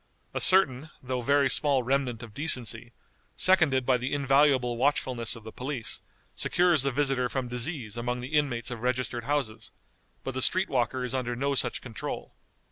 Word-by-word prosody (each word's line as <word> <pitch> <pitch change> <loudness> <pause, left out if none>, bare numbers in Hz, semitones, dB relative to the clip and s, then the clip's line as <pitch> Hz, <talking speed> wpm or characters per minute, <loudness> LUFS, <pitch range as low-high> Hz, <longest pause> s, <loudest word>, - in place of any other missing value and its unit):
A - - -2
certain, 155 -6 +3
though 125 0 -2
very 140 +3 +3
small 135 0 +3
remnant 125 -2 -1
of 115 -3 -11
decency, 120 -5 -1 0.4
seconded 160 -9 +3
by 130 -1 +3
the 125 +3 -3
invaluable 135 -3 +3
watchfulness 125 -2 0
of 115 - -12
the 110 - -9
police, 130 -2 -4 0.3
secures 175 -4 +3
the 140 +1 0
visitor 135 -2 0
from 130 -1 -3
disease 120 -2 -3
among 120 +1 -2
the 125 +4 -7
inmates 125 -6 0
of 120 -2 -6
registered 125 -1 -2
houses, 135 -7 -2 0.5
but 135 - -4
the 130 - -3
street 185 +7 +3
walker 125 0 0
is 125 0 -3
under 125 -2 -2
no 140 +3 -1
such 135 - +1
control. 115 -5 -6
130 Hz, 170 wpm, -28 LUFS, 120-140 Hz, 0.5 s, certain